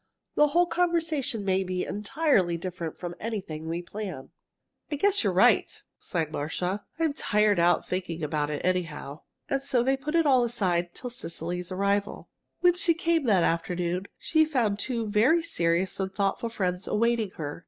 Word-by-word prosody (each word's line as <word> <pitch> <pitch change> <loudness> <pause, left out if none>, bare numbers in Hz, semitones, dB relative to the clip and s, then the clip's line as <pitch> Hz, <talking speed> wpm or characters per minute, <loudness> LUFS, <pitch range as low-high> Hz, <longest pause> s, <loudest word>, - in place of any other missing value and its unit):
The 295 - +5
whole 345 +4 +3
conversation 330 - 0
may 190 0 +2
be 185 -1 -2
entirely 210 - +1
different 170 -2 -5
from 175 -1 -5
anything 190 -8 -5
we 170 +2 -3
plan." 185 -8 -7 0.6
"I - - 0
guess 400 +6 +3
you're - - +2
right," - - +4 0.3
sighed 160 -3 -2
Marcia. 180 +7 -2
"I'm 320 -3 +1
tired 210 - +2
out 175 +1 +3
thinking 175 -3 -3
about 150 -1 -1
it, 150 +2 -3
anyhow." 155 -5 -2 0.3
And 275 - 0
so 250 -3 +1
they 265 +2 +2
put 300 +4 -4
it 330 -1 +4
all 260 -4 +5
aside 180 -7 -1
till 245 - -5
Cecily's 180 -6 -5
arrival. 200 +2 -1 0.3
When 355 -1 +6
she 350 -1 +2
came, 335 -2 +1
that 195 -7 +4
afternoon, 175 +2 -1
she 315 -1 +3
found 240 -10 0
two 230 -2 -2
very 235 +11 +3
serious 175 - 0
and 190 0 -2
thoughtful 200 +4 -1
friends 185 -4 -2
awaiting 230 -1 +1
her. 145 -1 -5
200 Hz, 165 wpm, -27 LUFS, 175-270 Hz, 0.6 s, When